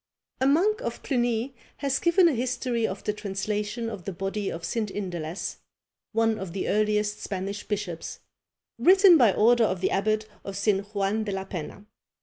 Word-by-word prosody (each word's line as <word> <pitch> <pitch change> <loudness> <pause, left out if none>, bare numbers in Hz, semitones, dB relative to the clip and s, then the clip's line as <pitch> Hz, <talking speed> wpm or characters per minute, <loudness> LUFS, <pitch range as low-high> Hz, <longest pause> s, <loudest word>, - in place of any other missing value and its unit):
A 260 - +3
monk 380 +10 +3
of - - -5
Cluny 240 -1 0 0.2
has 275 -1 0
given 345 +1 +5
a 325 - +3
history 245 -1 -1
of 190 +1 -6
the 210 - -1
translation 210 +3 -3
of 210 -6 -6
the 195 - -3
body 195 +3 -3
of 165 - -6
St. 220 -3 -2
Indalece, 180 -3 -4 0.5
one 225 0 +1
of 190 -3 -6
the 190 - -2
earliest 210 0 +1
Spanish 195 +1 -4
bishops, 195 -6 -4 0.6
written 380 0 +7
by 240 -9 +6
order 235 +4 +4
of 185 -3 -1
the 185 - 0
abbot 215 +2 0 0.2
of 195 -1 -6
St. 200 -1 +1
Juan 200 +2 0
de 210 - -3
la 190 0 -2
Penna. 190 +2 -7
210 Hz, 170 wpm, -26 LUFS, 195-240 Hz, 0.6 s, written